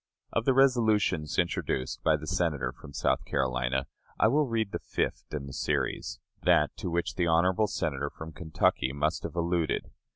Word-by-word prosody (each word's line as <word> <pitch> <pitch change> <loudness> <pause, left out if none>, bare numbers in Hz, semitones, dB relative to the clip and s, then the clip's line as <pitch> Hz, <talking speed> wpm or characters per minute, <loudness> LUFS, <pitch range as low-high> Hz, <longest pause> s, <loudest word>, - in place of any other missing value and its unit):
Of 115 - 0
the 135 - +3
resolutions 110 - +3
introduced 65 -1 -1
by 80 -1 +3
the 75 - -8
Senator 75 -7 0
from 70 - -13
South 70 - 0
Carolina, 65 0 0 0.3
I 110 - +5
will 145 +3 +3
read 110 -4 -1
the - - -3
fifth - - -3
in 75 -2 -4
the 70 - -8
series, - - -1 0.2
that - - +3
to - - -3
which 85 0 -1
the 90 -2 0
honorable 90 +5 +3
Senator 70 -7 -2
from 80 +2 -9
Kentucky 80 -5 0
must 75 +3 0
have - - -6
alluded. 85 -1 0
80 Hz, 170 wpm, -29 LUFS, 70-100 Hz, 0.3 s, I